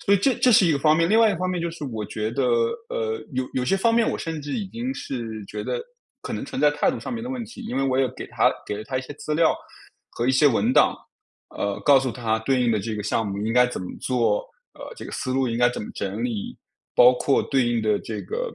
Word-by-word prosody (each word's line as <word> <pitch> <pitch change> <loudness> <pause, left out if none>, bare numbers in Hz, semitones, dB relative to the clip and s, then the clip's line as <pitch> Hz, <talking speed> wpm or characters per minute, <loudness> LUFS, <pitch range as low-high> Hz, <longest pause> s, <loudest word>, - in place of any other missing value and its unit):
所 200 - +6
以 - - +3
这 260 +8 +3
这 255 - +3
是 195 -3 +6
一 165 - +3
个 140 - +1
方 155 +2 +4
面， 165 0 +2
另 220 - +5
外 225 - +6
一 - - +1
个 - - -6
方 185 0 -1
面 180 - -2
就 170 0 -2
是 165 -2 -10
我 110 -5 -4
觉 110 0 -3
得， - - -1 0.5
呃， 455 -3 -2
有 130 0 -1
有 130 - 0
些 195 - +2
方 230 +4 +2
面 230 -1 +3
我 - - -1
甚 160 -2 -4
至 145 - -5
已 205 -4 -2
经 240 +6 -4
是 115 - -5
觉 - - -6
得， - - -2 0.4
可 - - -8
能 - - -3
存 - - -5
在 150 0 +5
态 150 - +1
度 255 - -5
上 - - -6
面 230 -1 -4
的 255 - -5
问 255 -2 -3
题， 245 +2 -10
因 230 - -5
为 135 - +1
我 130 -1 +1
也 135 - +3
给 - - -8
他 - - +2
给 105 - -3
了 110 - -7
他 130 -1 -2
一 - - -2
些 145 - -9
资 150 +1 -4
料， 165 0 +3 0.5
和 120 - -2
一 - - +5
些 130 +3 +4
文 115 -4 +3
档， - - +5 0.6
呃， 100 -1 -2
告 140 -2 +8
诉 130 -2 -2
他 110 -2 -1
对 130 +3 +1
应 120 - +2
的 110 - +2
这 110 +2 -4
个 105 - -4
项 110 +1 0
目 100 0 -4
应 115 - 0
该 125 0 +6
怎 125 - -5
么 90 - -5
做， 115 -5 +1 0.3
呃， - - -9
这 - - -9
个 - - -8
思 130 - -3
路 130 -1 +1
应 115 - -2
该 120 0 +4
怎 125 - -5
么 - - -7
整 100 +3 -4
理， 115 -5 -3 0.4
包 125 +1 +7
括 135 +2 +2
对 135 -3 +1
应 120 -1 +1
的 105 -1 +1
这 110 -2 -6
个 - - -4
130 Hz, 315 characters per minute, -24 LUFS, 115-185 Hz, 0.6 s, 告